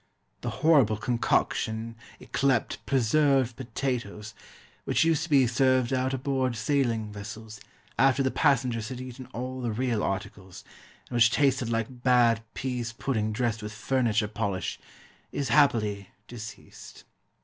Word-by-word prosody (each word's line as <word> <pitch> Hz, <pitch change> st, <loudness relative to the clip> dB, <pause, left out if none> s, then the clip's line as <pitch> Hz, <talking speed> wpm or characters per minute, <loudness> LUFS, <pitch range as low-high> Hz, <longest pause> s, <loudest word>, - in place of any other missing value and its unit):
The -, -, -3 dB, 0.2 s
horrible 135 Hz, -10 st, +5 dB
concoction 115 Hz, 0 st, -1 dB, 0.2 s
yclept 135 Hz, -5 st, 0 dB
"preserved 135 Hz, -1 st, +2 dB
potatoes," 115 Hz, -4 st, -4 dB, 0.5 s
which -, -, +2 dB
used 160 Hz, -1 st, +2 dB
to -, -, -12 dB
be 140 Hz, -4 st, +5 dB
served 130 Hz, +1 st, +2 dB
out 130 Hz, 0 st, +1 dB
aboard 130 Hz, -1 st, -1 dB
sailing 115 Hz, -3 st, 0 dB
vessels, 105 Hz, +1 st, -9 dB, 0.4 s
after 135 Hz, 0 st, +4 dB
the 130 Hz, -, +1 dB
passengers 120 Hz, -4 st, +1 dB
had 130 Hz, -1 st, -6 dB
eaten 130 Hz, 0 st, -8 dB
all 130 Hz, +1 st, -5 dB
the 120 Hz, -, -2 dB
real 120 Hz, -1 st, -1 dB
articles, 95 Hz, -1 st, -5 dB, 0.4 s
and 120 Hz, -, -3 dB
which 115 Hz, -1 st, +6 dB
tasted 135 Hz, -3 st, +1 dB
like 115 Hz, +2 st, -3 dB
bad 120 Hz, -3 st, +4 dB
pease 125 Hz, -3 st, -3 dB
pudding 110 Hz, -3 st, -1 dB
dressed 110 Hz, -1 st, -1 dB
with 105 Hz, 0 st, -6 dB
furniture 110 Hz, -2 st, 0 dB
polish, 100 Hz, -3 st, -3 dB, 0.5 s
is, 140 Hz, -3 st, -2 dB
happily, 110 Hz, -8 st, +2 dB, 0.2 s
deceased. 115 Hz, -2 st, -10 dB
120 Hz, 130 wpm, -27 LUFS, 110-130 Hz, 0.5 s, which